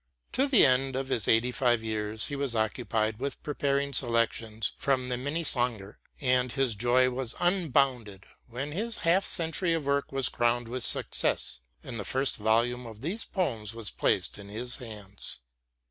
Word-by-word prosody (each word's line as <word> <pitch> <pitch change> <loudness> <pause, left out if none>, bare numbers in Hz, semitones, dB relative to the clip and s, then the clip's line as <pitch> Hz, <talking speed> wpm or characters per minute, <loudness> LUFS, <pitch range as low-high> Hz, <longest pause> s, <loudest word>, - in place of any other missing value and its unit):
To 270 +2 +1
the 265 -6 +6
end 130 +1 +2
of 135 0 -3
his 115 -6 +2
eighty 115 +3 +3
five 120 -3 +1
years 110 -1 0
he 145 - -3
was 140 -4 0
occupied 110 0 -1
with 140 +1 -4
preparing 140 -1 -1
selections 115 -3 0
from 130 -2 0
the 125 - 0
Minnesänger, 125 -7 -2 0.2
and 125 -2 +1
his 135 -3 +1
joy 125 +4 +2
was 125 -2 -3
unbounded 135 - 0 0.2
when 135 +5 -5
his 220 +8 -1
half 180 +4 +4
century 165 0 +3
of 160 -4 -3
work 140 0 0
was 135 -2 +2
crowned 120 0 0
with 125 +1 -3
success, - - 0 0.2
and 120 -4 -7
the - - -3
first 130 +6 +1
volume 115 +3 +1
of 110 -1 -11
these 185 - -2
poems 115 - -2
was 115 -3 -3
placed - - 0
in 100 0 -10
his 120 +4 -1
hands. 105 - -2
125 Hz, 165 wpm, -28 LUFS, 115-140 Hz, 0.2 s, the